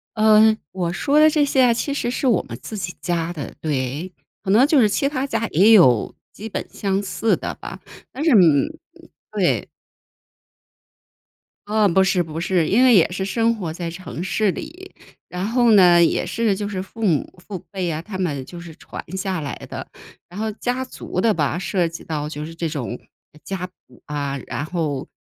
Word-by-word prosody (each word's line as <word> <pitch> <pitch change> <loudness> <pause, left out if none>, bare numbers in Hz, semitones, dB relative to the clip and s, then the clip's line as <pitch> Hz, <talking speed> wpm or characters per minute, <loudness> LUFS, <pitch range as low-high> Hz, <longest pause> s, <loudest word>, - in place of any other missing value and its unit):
嗯， 215 0 +5
我 175 -2 -2
说 285 +9 +2
的 310 - +7
这 300 -1 +2
些 275 -1 +1
呀 245 -2 +5
其 280 - -2
实 245 -3 -2
是 265 - -1
我 230 -7 +3
们 115 - -8
自 215 - -7
己 180 -2 -4
家 175 -1 -1
的， 150 -5 -7
对。 145 +4 -2 0.3
可 190 - -1
能 245 +7 +6
就 310 - +3
是 215 - +5
其 275 +7 +1
他 270 -2 -2
家 225 -4 -1
也 195 +8 +5
有 130 - +5 0.2
基 215 - -8
本 - - -4
相 195 -1 -1
似 210 +3 0
的 - - -5
吧， - - -9 0.3
但 285 - -5
是 325 - +3
嗯， 165 - +5 0.6
对。 - - 0 2.0
嗯， 210 -4 +2
不 190 - +5
是， 190 -1 +2
不 160 0 -6
是。 175 -3 +1
因 240 +5 +4
为 255 -2 +6
也 180 -6 +5
是 190 +1 -3
生 230 +3 +1
活 180 -7 -4
在 170 +1 -5
城 165 -5 -7
市 195 +2 +1
里， 355 - -9 0.4
然 180 +1 -3
后 240 0 +3
呢 175 -4 +7
也 165 - +1
是 225 -4 0
就 205 0 -3
是 190 -3 -3
父 220 +3 -5
母 170 0 0
父 200 - -5
辈 190 -3 -3
呀， 160 -2 -2
他 190 +1 -7
们 145 -8 -2
就 175 - -10
是 170 -2 -10
传 - - -9
下 190 -1 -2
来 145 -2 -4
的。 - - -6 0.4
然 180 - -12
后 220 0 -1
家 245 +4 -2
族 220 -7 -5
的 225 0 +3
吧， 155 -1 0
涉 180 -2 0
及 165 +1 -8
到 150 -2 -3
就 150 0 -6
是 165 - -9
这 165 0 -3
种 135 -5 -4 0.5
家 190 -2 -4
谱 155 -8 -18
啊， 140 -2 -3
然 145 - -4
后， 155 -5 -3
190 Hz, 210 characters per minute, -21 LUFS, 165-220 Hz, 2.0 s, 的